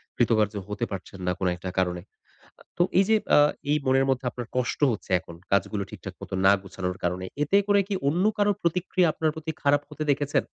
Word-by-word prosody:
কৃতকার্য 110 Hz, -3 st, +2 dB
হতে 105 Hz, +3 st, -2 dB
পারছেন 95 Hz, 0 st, -7 dB
না, 90 Hz, -, +3 dB
কোন 95 Hz, -, 0 dB
একটা 90 Hz, +1 st, -6 dB
কারণে। 90 Hz, -1 st, 0 dB, 0.6 s
আ -, -, -17 dB
তো 175 Hz, -, +4 dB, 0.2 s
এই -, -, +6 dB
যে 220 Hz, -, +6 dB, 0.2 s
আ -, -, +7 dB, 0.3 s
এই 150 Hz, -, +4 dB
মনের 135 Hz, +1 st, +3 dB
মধ্যে 130 Hz, 0 st, 0 dB
আপনার 120 Hz, -2 st, -7 dB
কষ্ট 125 Hz, -2 st, -1 dB
হচ্ছে, 105 Hz, -3 st, -6 dB
এখন 85 Hz, -, -12 dB, 0.2 s
কাজগুলো 100 Hz, +1 st, +1 dB
ঠিকঠাক -, -, -8 dB
মতো -, -, -8 dB
না 95 Hz, -, +8 dB
গোছানোর 90 Hz, -1 st, -4 dB
কারণে। 90 Hz, +1 st, -1 dB, 0.2 s
এতে 195 Hz, +7 st, +3 dB
করে 205 Hz, 0 st, +4 dB
কি 205 Hz, -, -1 dB
অন্য 170 Hz, +6 st, +2 dB
কারো 205 Hz, 0 st, +3 dB
প্রতিক্রিয়া 180 Hz, +1 st, +1 dB
আপনার 155 Hz, -1 st, 0 dB
প্রতি 160 Hz, 0 st, -4 dB
খারাপ 145 Hz, 0 st, +4 dB
হতে 155 Hz, -, -5 dB
দেখেছেন? 145 Hz, 0 st, 0 dB
125 Hz, 205 wpm, -26 LUFS, 95-155 Hz, 0.6 s, না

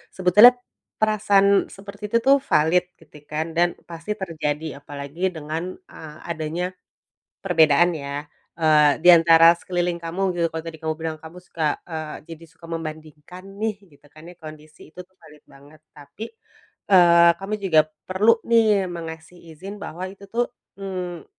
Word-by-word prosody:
sebetulnya 210 Hz, +7 st, +6 dB, 0.5 s
perasaan 200 Hz, -2 st, +3 dB
seperti 200 Hz, +2 st, -10 dB
itu 230 Hz, -, +1 dB
tuh, 275 Hz, +1 st, +5 dB
valid 175 Hz, -, +2 dB
gitu 150 Hz, -2 st, -18 dB
kan, 155 Hz, +2 st, -4 dB
dan 175 Hz, 0 st, +2 dB
pasti 170 Hz, +5 st, -6 dB
terjadi, 155 Hz, -6 st, -4 dB
apalagi 145 Hz, +6 st, -5 dB
dengan, 160 Hz, +4 st, -5 dB, 0.2 s
eee, 155 Hz, -1 st, -11 dB
adanya 165 Hz, +3 st, -4 dB, 0.7 s
perbedaan 170 Hz, -2 st, +4 dB
ya. 140 Hz, 0 st, -6 dB, 0.3 s
Eee, 155 Hz, -2 st, +3 dB
di 175 Hz, -, +6 dB
antara 165 Hz, 0 st, +7 dB
sekeliling 175 Hz, 0 st, -2 dB
kamu 165 Hz, +3 st, -5 dB, 0.2 s
gitu, 170 Hz, -, +1 dB
kalau 160 Hz, -, -4 dB
tadi 165 Hz, -1 st, -8 dB
kamu 160 Hz, 0 st, -3 dB
bilang, 160 Hz, 0 st, -5 dB
kamu 160 Hz, +2 st, -13 dB
suka, 160 Hz, -4 st, -3 dB
eee, 155 Hz, -2 st, -6 dB
jadi 165 Hz, 0 st, -10 dB
suka 165 Hz, +1 st, -18 dB
membandingkan 155 Hz, +1 st, -8 dB, 0.2 s
nih, 220 Hz, -1 st, -1 dB, 0.2 s
gitu -, -, -27 dB
kan, 155 Hz, +2 st, -13 dB
kondisi 155 Hz, -1 st, -14 dB
itu -, -, -14 dB
tuh, 185 Hz, +1 st, -22 dB
valid 150 Hz, -1 st, -17 dB
banget. 140 Hz, +2 st, -18 dB
Tapi, 145 Hz, +9 st, -10 dB, 0.7 s
eee, 170 Hz, -2 st, +6 dB
kamu 195 Hz, +2 st, -6 dB
juga 160 Hz, -5 st, +4 dB, 0.3 s
perlu 210 Hz, +5 st, +3 dB
nih, 220 Hz, -4 st, +3 dB
mengasih 165 Hz, 0 st, -9 dB, 0.2 s
izin 195 Hz, +4 st, -9 dB
bahwa 175 Hz, +4 st, -6 dB
itu 200 Hz, +1 st, -14 dB
tuh, 240 Hz, +3 st, -1 dB, 0.3 s
mmm, 180 Hz, -4 st, -6 dB
165 Hz, 150 wpm, -22 LUFS, 155-185 Hz, 0.7 s, antara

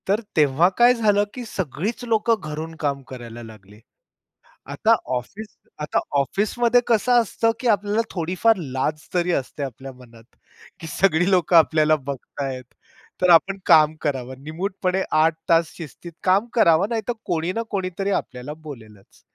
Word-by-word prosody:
तर 205 Hz, +4 st, +1 dB, 0.2 s
तेव्हा 150 Hz, +3 st, +4 dB
काय 240 Hz, +1 st, +6 dB
झालं 210 Hz, -4 st, +2 dB
की 250 Hz, -, -6 dB
सगळीच 200 Hz, -, -4 dB
लोकं 230 Hz, 0 st, +2 dB
घरून 155 Hz, +1 st, -6 dB
काम 140 Hz, -2 st, -1 dB
करायला 120 Hz, -2 st, -9 dB
लागले. 105 Hz, -2 st, -14 dB, 0.9 s
आता -, -, +2 dB, 0.2 s
ऑफिस 205 Hz, -, -7 dB, 0.2 s
आता 150 Hz, -1 st, -1 dB, 0.2 s
ऑफिसमध्ये 220 Hz, -, +1 dB
कसं 240 Hz, +1 st, +3 dB
असतं 225 Hz, +1 st, 0 dB
की 250 Hz, -, -2 dB
आपल्याला 210 Hz, 0 st, +2 dB
थोडीफार 185 Hz, +6 st, +1 dB
लाज 150 Hz, 0 st, -3 dB
तरी 180 Hz, 0 st, +1 dB
असते 140 Hz, -1 st, -3 dB
आपल्या 135 Hz, 0 st, -7 dB
मनात, 120 Hz, -3 st, -17 dB, 0.6 s
की 165 Hz, -, -8 dB
सगळी 175 Hz, +1 st, +2 dB
लोकं 180 Hz, -2 st, +2 dB
आपल्याला 155 Hz, -1 st, +4 dB
बघतायेत. 135 Hz, -1 st, -6 dB, 0.6 s
तर 180 Hz, -, +3 dB
आपण 185 Hz, +3 st, +5 dB
काम 155 Hz, 0 st, +5 dB
करावं. 130 Hz, -3 st, -3 dB
निमूटपणे 185 Hz, +4 st, -2 dB
8 160 Hz, +1 st, +3 dB
तास 165 Hz, -1 st, +3 dB
शिस्तीत 170 Hz, +1 st, -10 dB
काम 195 Hz, +4 st, +3 dB
करावं, 180 Hz, -3 st, +4 dB
नाहीतर 230 Hz, 0 st, -2 dB
कोणी 170 Hz, -1 st, -1 dB
ना 230 Hz, -, -2 dB
कोणीतरी 195 Hz, 0 st, -3 dB
आपल्याला 130 Hz, -5 st, -4 dB
बोलेलच. 110 Hz, -9 st, -13 dB
165 Hz, 145 wpm, -22 LUFS, 140-200 Hz, 0.9 s, काय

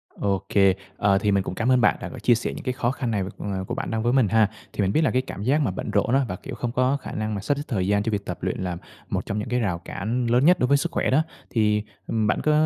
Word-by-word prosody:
OK. 100 Hz, -2 st, -1 dB, 0.5 s
Ờ, 100 Hz, -1 st, +3 dB
thì 105 Hz, +1 st, +1 dB
mình 100 Hz, -1 st, +2 dB
cũng 95 Hz, -, -5 dB
cám 115 Hz, +5 st, +1 dB
ơn 125 Hz, -, +4 dB
bạn 105 Hz, -, +4 dB
đã -, -, -5 dB
có 130 Hz, -, -9 dB
chia 120 Hz, +2 st, +4 dB
sẻ 115 Hz, -, -3 dB
những -, -, -8 dB
cái 130 Hz, -, 0 dB
khó 125 Hz, -1 st, 0 dB
khăn 130 Hz, -3 st, -3 dB
này, 105 Hz, -3 st, 0 dB
ờ, 95 Hz, -2 st, -3 dB
của -, -, -3 dB
bạn -, -, -4 dB
đang 110 Hz, 0 st, -1 dB
với 120 Hz, -, +2 dB
mình 130 Hz, -5 st, +4 dB
ha. 110 Hz, +1 st, +3 dB, 0.2 s
Thì -, -, -1 dB
mình 95 Hz, -1 st, +2 dB
biết 155 Hz, -, +3 dB
là -, -, +2 dB
cái 130 Hz, -, +2 dB
cảm 105 Hz, -6 st, -7 dB
giác 140 Hz, +7 st, +2 dB
mà 120 Hz, -10 st, +1 dB
bận 105 Hz, -, -5 dB
rộn 105 Hz, +4 st, +1 dB
á, 135 Hz, 0 st, +3 dB
và, 90 Hz, -, -4 dB
kiểu, 135 Hz, +6 st, -8 dB
không 120 Hz, -1 st, -3 dB
có 130 Hz, +3 st, +2 dB
khả 135 Hz, -, -8 dB
năng 110 Hz, 0 st, -2 dB
mà 100 Hz, -, -3 dB
sắp 140 Hz, +7 st, 0 dB
xếp 145 Hz, -, -3 dB
thời 95 Hz, -7 st, -1 dB
gian 100 Hz, 0 st, +2 dB
cho 115 Hz, -, -1 dB
việc 100 Hz, -1 st, -2 dB
tập -, -, -4 dB
luyện -, -, -2 dB
là 90 Hz, -2 st, -3 dB, 0.3 s
một -, -, -2 dB
trong 100 Hz, -, -2 dB
những 105 Hz, -, -4 dB
cái 125 Hz, -, +1 dB
rào 95 Hz, -7 st, -1 dB
cản 115 Hz, +5 st, -2 dB
lớn 125 Hz, +4 st, +3 dB
nhất 180 Hz, +2 st, +6 dB
đối 125 Hz, -, +2 dB
với 140 Hz, +2 st, +4 dB
sức -, -, -2 dB
khỏe -, -, 0 dB
đó. 145 Hz, +5 st, +4 dB, 0.3 s
Thì, 105 Hz, -2 st, +2 dB, 0.2 s
ừm, 110 Hz, -2 st, 0 dB
bạn -, -, +1 dB
có, 155 Hz, -, +2 dB
115 Hz, 325 wpm, -24 LUFS, 100-125 Hz, 0.5 s, nhất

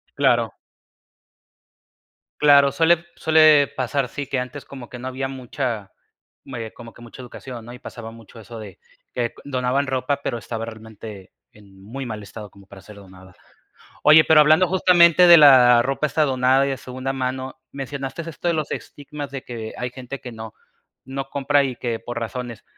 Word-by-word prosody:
Claro. -, -, +2 dB, 1.8 s
Claro, 140 Hz, -2 st, +5 dB
suele 165 Hz, +3 st, +2 dB
suele 155 Hz, -2 st, +5 dB
pasar, 130 Hz, +1 st, -1 dB
sí, 145 Hz, -, -6 dB
que 130 Hz, -, -2 dB
antes 125 Hz, +3 st, -6 dB
como 130 Hz, -3 st, -11 dB
que 125 Hz, -, -9 dB
no 130 Hz, -, -6 dB
había 135 Hz, +1 st, -4 dB
mucha 125 Hz, -5 st, -5 dB, 0.5 s
me 115 Hz, -4 st, -7 dB
como 115 Hz, -2 st, -12 dB
que -, -, -17 dB
mucha 120 Hz, +2 st, -12 dB
educación, 125 Hz, -1 st, -10 dB
¿no? 120 Hz, -, -10 dB
Y 125 Hz, -, -12 dB
pasaba 115 Hz, -4 st, -9 dB
mucho 115 Hz, 0 st, -15 dB
eso 115 Hz, +1 st, -10 dB
de 100 Hz, -4 st, -11 dB, 0.3 s
que 120 Hz, -2 st, -2 dB
donaban 130 Hz, 0 st, -1 dB
ropa, 130 Hz, +2 st, -2 dB
pero 120 Hz, -, -2 dB
estaba 115 Hz, -1 st, -6 dB
realmente 110 Hz, -3 st, -11 dB, 0.2 s
en 100 Hz, -2 st, -19 dB
muy 135 Hz, +6 st, -7 dB
mal 110 Hz, -3 st, -6 dB
estado 105 Hz, +1 st, -10 dB
como 100 Hz, 0 st, -19 dB
para 95 Hz, 0 st, -14 dB
ser 105 Hz, +1 st, -14 dB
donada. 95 Hz, -2 st, -16 dB, 0.7 s
Oye, 155 Hz, +1 st, +7 dB
pero 160 Hz, -1 st, +5 dB
hablando 155 Hz, +4 st, +5 dB
justamente 180 Hz, -1 st, +5 dB
de 170 Hz, -1 st, +10 dB
la 125 Hz, -5 st, +7 dB
ropa 135 Hz, +3 st, -1 dB
esta 155 Hz, +2 st, +1 dB
donada 130 Hz, 0 st, +2 dB
y -, -, -2 dB
de 135 Hz, -, -3 dB
segunda 130 Hz, +2 st, -5 dB
mano, 130 Hz, 0 st, -4 dB
mencionaste 135 Hz, +3 st, -6 dB
esto 165 Hz, +1 st, -6 dB
de 170 Hz, -, +2 dB
los 155 Hz, -2 st, -3 dB
estigmas 145 Hz, 0 st, -7 dB
de 135 Hz, -2 st, -7 dB
que 115 Hz, -2 st, -7 dB
hay 125 Hz, -, -3 dB
gente 130 Hz, +1 st, -8 dB
que 125 Hz, -, -8 dB
no 110 Hz, -1 st, -9 dB, 0.5 s
no 135 Hz, +1 st, -6 dB
compra 140 Hz, +1 st, +1 dB
y 130 Hz, -2 st, -3 dB
que 115 Hz, -2 st, -4 dB
por 120 Hz, 0 st, -6 dB
razones. 120 Hz, -1 st, -6 dB
130 Hz, 180 wpm, -22 LUFS, 115-140 Hz, 1.8 s, de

